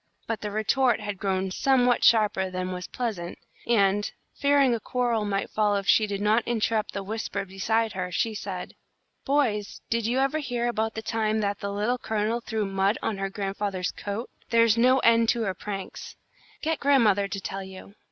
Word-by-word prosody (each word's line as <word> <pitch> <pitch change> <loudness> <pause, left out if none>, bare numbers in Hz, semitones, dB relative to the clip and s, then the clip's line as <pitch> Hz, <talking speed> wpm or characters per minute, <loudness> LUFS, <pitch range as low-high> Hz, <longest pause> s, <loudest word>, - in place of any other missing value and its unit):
But 225 -1 -3
the 210 - -3
retort 235 +5 +2
had 205 -2 -5
grown 190 -1 -1
somewhat 250 +2 +3
sharper 210 -4 +4
than 185 0 -3
was 180 0 -5
pleasant, 210 -9 -4 0.3
and, 205 -3 +2 0.2
fearing 280 -3 +3
a 230 - -1
quarrel 235 -3 0
might 200 -1 -2
follow 210 -1 +2
if 200 - -3
she 215 - +5
did 200 -1 -3
not 215 +3 +3
interrupt 225 -2 0
the 200 - -4
whispers 215 -1 -4
beside 220 +4 0
her, 180 -1 -3
she 220 +5 0
said: 195 -3 -6 0.5
"Boys, 245 -8 0
did 230 -1 +1
you 245 +2 0
ever 275 +3 +1
hear 245 -5 -2
about 220 -2 -1
the 220 - -4
time 220 -1 0
that 200 -1 -1
the 200 - -4
Little 215 +5 0
Colonel 220 +2 -1
threw 220 -2 -2
mud 195 +2 +1
on 205 -3 -2
her 195 0 -1
grandfather's 195 -2 -3
coat? 205 +4 -5 0.2
There's 230 -2 +4
no 250 +3 +4
end 230 -1 +4
to 235 -1 +2
her 195 -3 -1
pranks. 195 0 -7 0.5
Get 320 -1 0
grandmother 220 -8 +3
to 195 - -4
tell 195 0 -5
you." 190 +1 -11
215 Hz, 185 wpm, -26 LUFS, 195-235 Hz, 0.5 s, she